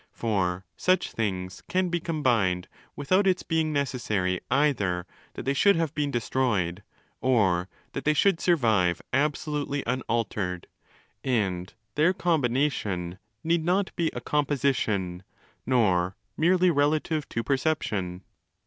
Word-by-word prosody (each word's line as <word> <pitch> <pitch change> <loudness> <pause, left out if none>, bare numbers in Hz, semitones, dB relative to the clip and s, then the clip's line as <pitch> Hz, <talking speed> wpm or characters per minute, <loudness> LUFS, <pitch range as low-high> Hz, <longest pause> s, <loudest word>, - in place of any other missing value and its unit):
For 95 -5 -1
such 185 0 +1
things 95 -4 -3
can 185 0 +1
be 175 0 0
'combined' 120 - +1 0.3
without 185 +8 +2
its 185 -1 +2
being 160 -2 0
necessary 110 -10 -1
ezther 115 -11 +1 0.3
that - - -5
they 135 - +1
should 200 +8 +4
have 165 -3 -1
been 145 -2 -1
destroyed 110 -8 0 0.4
or 95 -8 +2 0.2
that - - -4
they 150 0 +2
should 195 +2 +3
survive 110 - +2
absolutely 145 -1 -1
un 125 +2 -1
altered: 95 -6 -1 0.6
and 95 -8 -1 0.2
their 155 +5 +3
'combination' 125 - 0 0.2
need 165 0 +1
not 185 +3 0
be 170 -3 +1
a - - -4
'composition', 130 -11 0 0.5
nor 95 -7 +2 0.2
merely 180 +2 +4
'relative 150 +1 +1
to 115 - -2
perception'. 105 - -1
130 Hz, 120 wpm, -27 LUFS, 95-155 Hz, 0.6 s, should